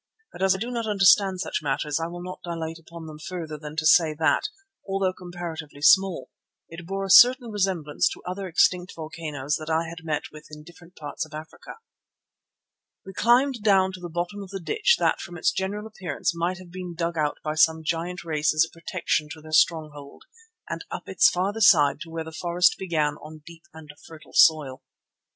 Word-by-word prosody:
But -, -, -10 dB
as 190 Hz, 0 st, +3 dB
I -, -, -3 dB
do 235 Hz, +5 st, -4 dB
not 230 Hz, -2 st, -3 dB
understand 195 Hz, -2 st, +4 dB
such -, -, -3 dB
matters 145 Hz, +1 st, -1 dB
I 165 Hz, -, -2 dB
will 175 Hz, +1 st, -8 dB
not 185 Hz, 0 st, -7 dB
dilate 165 Hz, -1 st, -5 dB
upon 165 Hz, 0 st, -11 dB
them 155 Hz, -1 st, -10 dB
further 160 Hz, -2 st, -6 dB
than 150 Hz, 0 st, -9 dB
to 155 Hz, 0 st, -2 dB
say 155 Hz, -1 st, +5 dB
that, 160 Hz, -, +1 dB, 0.4 s
although 195 Hz, -1 st, 0 dB
comparatively 170 Hz, -5 st, -8 dB
small, 190 Hz, +2 st, +4 dB, 0.4 s
it 165 Hz, +1 st, -11 dB
bore 195 Hz, +1 st, -3 dB
a -, -, -6 dB
certain 245 Hz, 0 st, +7 dB
resemblance 185 Hz, -7 st, 0 dB
to -, -, -10 dB
other 185 Hz, +2 st, -5 dB
extinct 180 Hz, +1 st, +2 dB
volcanoes 155 Hz, -3 st, -4 dB
which 155 Hz, +1 st, -8 dB
I 165 Hz, +1 st, 0 dB
had 170 Hz, 0 st, -10 dB
met 155 Hz, -2 st, -3 dB
with 150 Hz, 0 st, -13 dB
in 150 Hz, 0 st, -11 dB
different 175 Hz, +2 st, -17 dB
parts 150 Hz, +1 st, -5 dB
of 155 Hz, -1 st, -10 dB
Africa. 155 Hz, +1 st, -10 dB, 1.3 s
We 195 Hz, -, -9 dB
climbed 245 Hz, +3 st, +2 dB
down 195 Hz, -3 st, +3 dB
to 185 Hz, -, -9 dB
the 175 Hz, -1 st, -7 dB
bottom 175 Hz, +5 st, -4 dB
of 195 Hz, -, -9 dB
the 195 Hz, 0 st, -6 dB
ditch 435 Hz, -, +2 dB
that -, -, +1 dB
from 175 Hz, -1 st, -8 dB
its -, -, +2 dB
general 200 Hz, +3 st, -3 dB
appearance 180 Hz, -7 st, -3 dB
might 175 Hz, +2 st, -1 dB
have 185 Hz, -2 st, -13 dB
been 180 Hz, -1 st, -7 dB
dug 170 Hz, 0 st, -2 dB
out 150 Hz, -2 st, -1 dB
by 155 Hz, -, -2 dB
some 160 Hz, +1 st, +3 dB
giant 170 Hz, +3 st, -3 dB
race 155 Hz, -2 st, 0 dB
as 155 Hz, +1 st, +4 dB
a -, -, -17 dB
protection 165 Hz, -3 st, -2 dB
to 160 Hz, -, -12 dB
their 155 Hz, 0 st, -12 dB
stronghold, 155 Hz, -3 st, 0 dB, 0.4 s
and -, -, -5 dB
up -, -, -7 dB
its -, -, +4 dB
farther 195 Hz, +5 st, -2 dB
side 150 Hz, -9 st, +5 dB
to 170 Hz, 0 st, -9 dB
where 165 Hz, 0 st, -5 dB
the 160 Hz, -, -9 dB
forest 175 Hz, +2 st, +2 dB
began 155 Hz, -5 st, -1 dB
on 155 Hz, 0 st, -12 dB
deep 165 Hz, 0 st, -14 dB
and 160 Hz, -2 st, -12 dB, 0.2 s
fertile 160 Hz, -1 st, -14 dB
soil. 150 Hz, -5 st, +4 dB
170 Hz, 200 wpm, -25 LUFS, 155-185 Hz, 1.3 s, certain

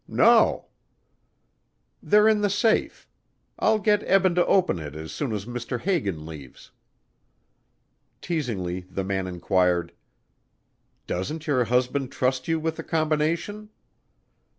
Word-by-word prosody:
"No." -, -, +4 dB, 1.4 s
"They're 210 Hz, +1 st, +4 dB
in 215 Hz, -1 st, +3 dB
the 205 Hz, -, +2 dB
safe. 215 Hz, +3 st, 0 dB, 0.5 s
I'll 220 Hz, -, +3 dB
get 210 Hz, 0 st, +2 dB
Eben 190 Hz, -1 st, +3 dB
to 175 Hz, 0 st, +3 dB
open 180 Hz, -, +2 dB
it 75 Hz, -2 st, -8 dB
as 80 Hz, 0 st, -7 dB
soon 140 Hz, -6 st, -3 dB
as 105 Hz, -2 st, -4 dB
Mr. 120 Hz, +1 st, -5 dB
Hagan 100 Hz, -, -1 dB
leaves." 75 Hz, -5 st, -11 dB, 1.5 s
Teasingly 110 Hz, -, -3 dB
the 95 Hz, +1 st, -3 dB
man 95 Hz, -1 st, -2 dB
inquired, 90 Hz, -1 st, 0 dB, 1.1 s
"Doesn't 150 Hz, -, -4 dB
your 130 Hz, -5 st, +1 dB
husband 125 Hz, +3 st, 0 dB
trust 130 Hz, 0 st, -1 dB
you 165 Hz, -1 st, +1 dB
with 160 Hz, 0 st, -3 dB
the -, -, -5 dB
combination?" 165 Hz, +7 st, -1 dB
130 Hz, 120 wpm, -25 LUFS, -, 1.5 s, No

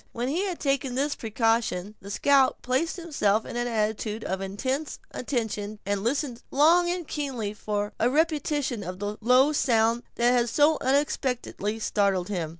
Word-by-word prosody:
When 240 Hz, +2 st, -2 dB
he 350 Hz, +8 st, 0 dB
had 365 Hz, -4 st, -4 dB
taken 275 Hz, -3 st, 0 dB
this 285 Hz, +2 st, 0 dB
precaution, 225 Hz, -3 st, 0 dB
the 200 Hz, -, -10 dB
scout 270 Hz, +5 st, +3 dB
placed 260 Hz, +7 st, 0 dB
himself 255 Hz, -, 0 dB
in -, -, -7 dB
an 240 Hz, 0 st, -1 dB
attitude 220 Hz, -1 st, -1 dB
of 190 Hz, +1 st, -3 dB
intense 260 Hz, +10 st, -3 dB
attention 220 Hz, -5 st, -3 dB
and 200 Hz, 0 st, -1 dB
listened 250 Hz, 0 st, -1 dB
long 335 Hz, +5 st, +4 dB
and 350 Hz, -3 st, -3 dB
keenly 255 Hz, -8 st, -3 dB
for 205 Hz, -1 st, -3 dB
a 235 Hz, -, +3 dB
repetition 295 Hz, -5 st, 0 dB
of 180 Hz, 0 st, -6 dB
the 205 Hz, +2 st, -4 dB
low 255 Hz, +5 st, +5 dB
sound 230 Hz, -4 st, +2 dB
that 240 Hz, +1 st, +3 dB
had 240 Hz, -1 st, +2 dB
so 300 Hz, +5 st, +3 dB
unexpectedly 255 Hz, -6 st, -1 dB
startled 200 Hz, -4 st, 0 dB
him. 175 Hz, -6 st, -2 dB
240 Hz, 160 wpm, -26 LUFS, 210-285 Hz, -, low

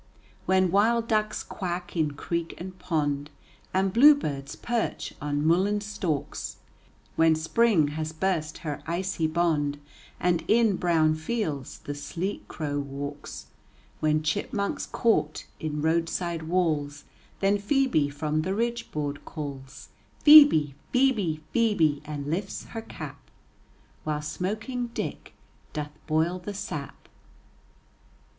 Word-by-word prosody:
When 185 Hz, -1 st, +3 dB
wild 225 Hz, +4 st, +3 dB
ducks 215 Hz, -2 st, 0 dB
quack 180 Hz, -2 st, -5 dB
in 155 Hz, -3 st, +1 dB
creek 170 Hz, +2 st, -3 dB
and 185 Hz, +1 st, -7 dB
pond 145 Hz, -5 st, -1 dB, 0.4 s
And 190 Hz, 0 st, +1 dB
bluebirds 230 Hz, -, +4 dB
perch 235 Hz, -1 st, -2 dB
on 145 Hz, 0 st, -1 dB
mullein 190 Hz, +6 st, +3 dB
stalks, 195 Hz, -8 st, -3 dB, 0.6 s
When 160 Hz, 0 st, +5 dB
spring 160 Hz, 0 st, +3 dB
has 155 Hz, +1 st, -3 dB
burst 160 Hz, -2 st, -1 dB
her 150 Hz, -2 st, -3 dB
icy 170 Hz, -1 st, -1 dB
bond 155 Hz, -3 st, +1 dB, 0.4 s
And 175 Hz, -2 st, +1 dB
in 220 Hz, -4 st, +4 dB
brown 160 Hz, -3 st, +3 dB
fields 155 Hz, -, -3 dB
the 145 Hz, -, -4 dB
sleek 170 Hz, +7 st, -4 dB
crow 145 Hz, -2 st, -3 dB
walks, 145 Hz, +1 st, -6 dB, 0.5 s
When 155 Hz, 0 st, +2 dB
chipmunks 200 Hz, +5 st, -1 dB
court 215 Hz, -10 st, +1 dB
in 150 Hz, -1 st, -3 dB
roadside 165 Hz, 0 st, 0 dB
walls, 155 Hz, -5 st, 0 dB, 0.4 s
Then 200 Hz, +1 st, +2 dB
Phœbe 205 Hz, -, +2 dB
from 150 Hz, +1 st, -1 dB
the 190 Hz, +4 st, -1 dB
ridgeboard 210 Hz, -11 st, -2 dB
calls, 140 Hz, -3 st, -7 dB, 0.4 s
"Phœbe, 290 Hz, -, +9 dB, 0.2 s
Phœbe, 220 Hz, -12 st, +2 dB
phœbe," 195 Hz, -11 st, +3 dB
and 145 Hz, -2 st, -5 dB
lifts 180 Hz, +7 st, -3 dB
her 225 Hz, -, -5 dB
cap, -, -, -9 dB, 0.7 s
While 150 Hz, -1 st, -2 dB
smoking 215 Hz, -, -3 dB
Dick -, -, -5 dB, 0.4 s
doth 150 Hz, -1 st, -4 dB, 0.2 s
boil 165 Hz, +3 st, +1 dB
the 200 Hz, +3 st, -6 dB
sap. 145 Hz, -7 st, -6 dB
165 Hz, 115 wpm, -27 LUFS, 150-200 Hz, 0.7 s, Phœbe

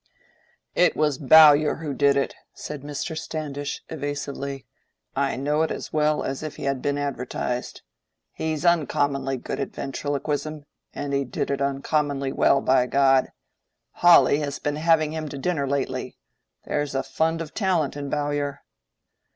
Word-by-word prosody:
"It -, -, +3 dB
was 150 Hz, -3 st, +1 dB
Bowyer 150 Hz, +1 st, +7 dB
who 150 Hz, -3 st, -5 dB
did 140 Hz, 0 st, +3 dB
it," 140 Hz, -, 0 dB, 0.2 s
said 150 Hz, -2 st, -7 dB
Mr. 145 Hz, +2 st, -5 dB
Standish, 145 Hz, -3 st, -5 dB
evasively. 140 Hz, -2 st, -5 dB, 0.5 s
"I 140 Hz, 0 st, 0 dB
know 145 Hz, +3 st, 0 dB
it 160 Hz, -, +1 dB
as -, -, -6 dB
well 150 Hz, 0 st, +2 dB
as 135 Hz, 0 st, -3 dB
if 155 Hz, -1 st, -6 dB
he -, -, -8 dB
had 135 Hz, -2 st, -1 dB
been 145 Hz, 0 st, -1 dB
advertised. 130 Hz, -3 st, -3 dB, 0.5 s
He's 160 Hz, 0 st, -3 dB
uncommonly 140 Hz, -5 st, +1 dB
good -, -, -5 dB
at 140 Hz, -, -4 dB
ventriloquism, 145 Hz, +2 st, -3 dB, 0.3 s
and 145 Hz, -1 st, -4 dB
he 140 Hz, 0 st, +1 dB
did 130 Hz, +2 st, -3 dB
it 140 Hz, -, -2 dB
uncommonly 140 Hz, 0 st, 0 dB
well, 140 Hz, -, +3 dB
by 130 Hz, -1 st, +3 dB
God! 135 Hz, -1 st, +3 dB, 0.6 s
Hawley 175 Hz, -4 st, +6 dB
has 145 Hz, -2 st, -3 dB
been 145 Hz, 0 st, -2 dB
having 155 Hz, -1 st, +2 dB
him 155 Hz, -1 st, -4 dB
to 140 Hz, -, -7 dB
dinner 145 Hz, -1 st, -1 dB
lately: 130 Hz, -2 st, -2 dB, 0.5 s
there's 145 Hz, -2 st, -2 dB
a 135 Hz, -, 0 dB
fund 160 Hz, +1 st, 0 dB
of 165 Hz, -2 st, -6 dB
talent 180 Hz, -, 0 dB
in 140 Hz, -1 st, -5 dB
Bowyer." 145 Hz, -1 st, -2 dB
145 Hz, 150 wpm, -24 LUFS, 140-155 Hz, 0.6 s, Bowyer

